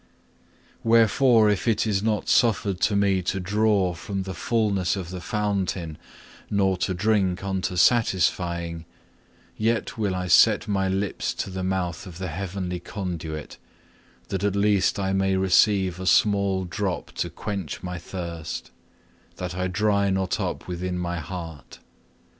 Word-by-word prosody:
4. 115 - -1
Wherefore 115 0 +5
if 105 +3 -2
it 110 -1 +2
is 100 -3 +1
not 110 -1 0
suffered 105 -5 +2
to 105 - +2
me 100 -2 +2
to 90 +2 -2
draw 100 -1 +2
from 95 +3 -4
the 95 0 -5
fulness 100 -3 0
of 90 -3 -6
the 90 -1 -6
fountain, 100 -7 -2 0.5
nor 95 -2 +2
to 95 +1 -1
drink 95 -2 +1
unto 95 -2 -2
satisfying, 90 -5 +1 0.7
yet 115 +1 -1
will 100 -4 0
I 90 0 -2
set 90 - +5
my 95 -2 0
lips 95 0 -2
to 95 - -4
the 95 0 -4
mouth 95 -1 -2
of 85 -2 -10
the 95 0 -4
heavenly 90 +1 -4
conduit, 85 -5 -6 0.7
that 95 0 -2
at 100 -1 +1
least 100 -1 +2
I 95 -1 0
may 95 0 +2
receive 95 -1 +3
a 95 - -4
small 100 -1 +3
drop 95 +1 -3
to - - -1
quench 100 -8 -5
my 90 -1 -4
thirst, 85 -2 -6 0.6
that 90 -1 -5
I 90 +1 -1
dry 100 +1 +1
not 95 -1 0
up - - -3
within 90 0 -3
my 85 -1 -2
heart. 80 -5 -8
95 Hz, 150 wpm, -25 LUFS, 90-100 Hz, 0.7 s, Wherefore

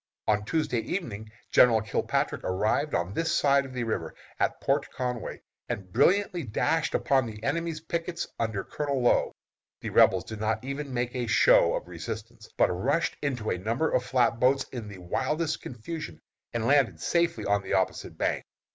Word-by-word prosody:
"On 105 -1 +2
Tuesday 155 -2 0
evening 110 - -4 0.2
General 115 -3 +6
Kilpatrick 115 +5 -1
arrived 110 +10 0
on 85 +3 -1
this 165 +6 0
side 140 -1 +3
the 125 -1 -3
river, 110 -1 -3 0.2
at - - 0
Port - - 0
Conway, 125 -3 -4 0.3
and 95 -2 -5
brilliantly 195 -1 +3
dashed 150 +7 0
upon 130 -3 +2
the 105 -1 -9
enemy's 160 +3 -1
pickets 170 +1 -3
under 110 -4 -1
Colonel 140 -3 -2
Low. 120 - +3 0.5
The - - -4
Rebels 95 -1 +5
did 110 -1 -8
not 110 +3 -1
even 140 +1 -4
make 120 0 -2
a 125 -2 -2
show 110 - +5
of - - -4
resistance, 105 +6 -7
but - - +4
rushed 140 - 0
into 125 -6 -1
a 90 - -1
number 115 - 0
of 125 - +2
flat 125 -2 +2
boats 135 +2 +3
in 120 -4 -6
the 100 -2 -9
wildest 135 - -1
confusion, 120 - -7 0.3
and 115 -1 -2
landed 140 -2 +3
safely 170 -1 +1
on 100 0 +2
the 95 - -4
opposite 95 -1 -1
bank. - - 0
125 Hz, 170 wpm, -28 LUFS, 110-145 Hz, 0.5 s, General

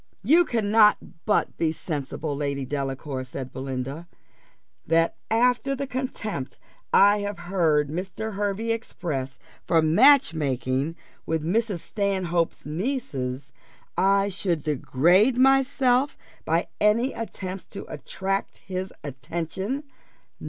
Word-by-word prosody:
"You 325 - +5
cannot 215 -3 +4 0.3
but 210 - +1
be 160 -1 +1
sensible, 150 -1 -4
Lady 140 -1 -2
Delacour," 135 0 -3
said 130 0 -7
Belinda, 135 +4 -5 0.8
"that 165 +1 +3
after 250 +4 +2
the 275 +1 -3
contempt 250 - -4 0.3
I 205 +1 +6
have 205 -1 -3
heard 165 -5 +1
Mr. 190 +6 -4
Hervey 205 +3 -1
express 145 -12 -4 0.3
for 165 - +4
match 245 - +6
making 135 0 -1 0.3
with 160 -1 -1
Mrs. 205 0 0
Stanhope's 185 -5 -1
nieces, 150 - -3 0.4
I 195 +1 +3
should 180 -5 -1
degrade 175 - +3
myself 270 0 +3 0.3
by 165 +2 +1
any 230 +5 +3
attempts 190 -4 -6
to 200 - -8
attract 195 +1 -3
his 185 0 -5
attention. 170 - -4
185 Hz, 110 wpm, -25 LUFS, 150-220 Hz, 0.8 s, I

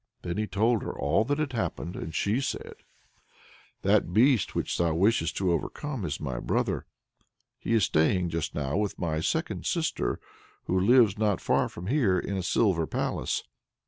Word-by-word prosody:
Then 85 +2 -3
he 110 - -1
told 110 +2 +2
her - - -5
all - - +2
that 145 +3 0
had 150 -4 -2
happened, 90 -6 -3
and 80 - -6
she 110 +6 +1
said: 130 - -4 1.1
"That - - +3
beast 115 - +3
which - - -1
thou 85 -2 +2
wishest 85 -3 +2
to 95 -2 +1
overcome 125 - -3
is 75 -3 -3
my 65 -5 -3
brother. - - -1 0.7
He 115 - 0
is 110 - +3
staying 85 +3 +2
just 85 -2 -3
now 70 +3 -1
with 105 -1 -1
my 80 -3 -1
second 80 - -2
sister, - - -1 0.4
who 95 - 0
lives 110 0 +5
not 105 -4 +2
far - - +1
from 85 - -9
here 110 -5 +2
in 100 - -2
a 95 - -1
silver 90 -3 +1
palace. - - -2
95 Hz, 175 wpm, -28 LUFS, 85-115 Hz, 1.1 s, lives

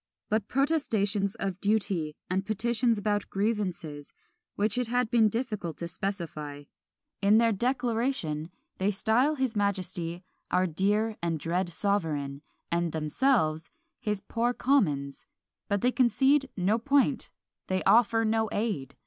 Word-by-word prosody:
but 215 -1 0
protestations 220 -9 +1
of 195 -4 -4
duty, 195 -7 0
and 190 +1 0
petitions 230 +2 +1
about 205 0 -1
grievances, 185 -8 -2 0.4
which 205 0 +1
it 250 -1 0
had 245 -1 0
been 225 -3 +5
difficult 210 - -3
to 170 - -4
specify. 160 -6 -5 0.6
In 205 +2 +5
their 230 0 +4
"Declaration" 230 - -1 0.3
they 190 +2 +2
style 225 +9 +2
his 260 -5 -1
Majesty 185 -4 -2 0.3
"Our 185 - +2
dear 205 +6 0
and 165 -2 -1
dread 175 +4 -1
sovereign," 160 -7 -1 0.3
and 170 -1 0
themselves 160 - +1 0.3
"his 210 -2 -2
poor 240 +2 -1
Commons:" 150 - +1 0.4
but 200 -1 0
they 250 - +3
concede 270 +3 +3
no 200 +5 +2
point 280 +3 +2 0.4
they 185 0 0
offer 225 0 +4
no 220 0 +1
aid! 200 - -2
205 Hz, 130 wpm, -28 LUFS, 175-230 Hz, 0.6 s, been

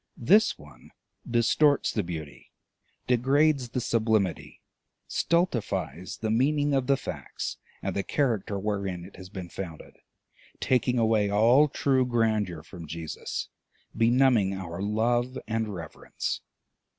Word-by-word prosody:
This 200 - +4
one - - -16 0.4
distorts 130 +5 +3
the 110 - +1
beauty, 80 -5 -8 0.5
degrades 135 +2 +2
the 125 - -2
sublimity, 110 -5 0 0.5
stultifies 120 - -1
the 110 -1 0
meaning 145 +5 +2
of 135 -2 +1
the 140 -1 +4
facts - - -5 0.3
and - - -2
the 100 - +1
character 110 -3 -1
wherein 100 -3 -3
it 95 - -14
has 95 -1 -10
been 95 -3 -7
founded, 85 -4 -8 0.6
taking 125 -1 +1
away 110 -3 +3
all 115 +8 +5
true 135 -2 +1
grandeur 110 -9 0
from 85 -2 -10
Jesus, 80 0 -5 0.5
benumbing 115 -4 +3
our 90 -1 -6
love 120 +5 0
and 110 0 -1
reverence. 85 -5 -5
110 Hz, 120 wpm, -27 LUFS, 95-130 Hz, 0.6 s, all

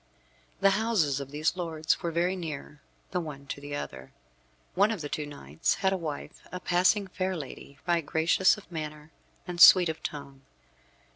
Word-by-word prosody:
The 195 0 +6
houses 195 -10 +1
of 140 -1 -6
these 150 +4 0
lords 160 -3 -1
were 170 - -1
very 175 +3 0
near 150 -4 -7 0.3
the 180 - 0
one 150 -4 -7
to 140 - -6
the 145 0 -5
other. 65 - -7 0.6
One 200 +3 +4
of 220 -6 -3
the 145 - -5
two 150 0 -3
knights 80 - -2
had 190 -1 +1
to 190 - 0
wife 155 -5 -6
a 180 - -5
passing 185 +4 +2
fair 185 0 -2
lady, 140 -1 -9
right 170 -1 +2
gracious 160 +6 +3
of 205 - -15
manner 150 -1 -6 0.4
and 175 -1 -3
sweet 180 -2 +9
of 160 - -5
tongue. 140 -2 -7
160 Hz, 175 wpm, -28 LUFS, 145-185 Hz, 0.6 s, sweet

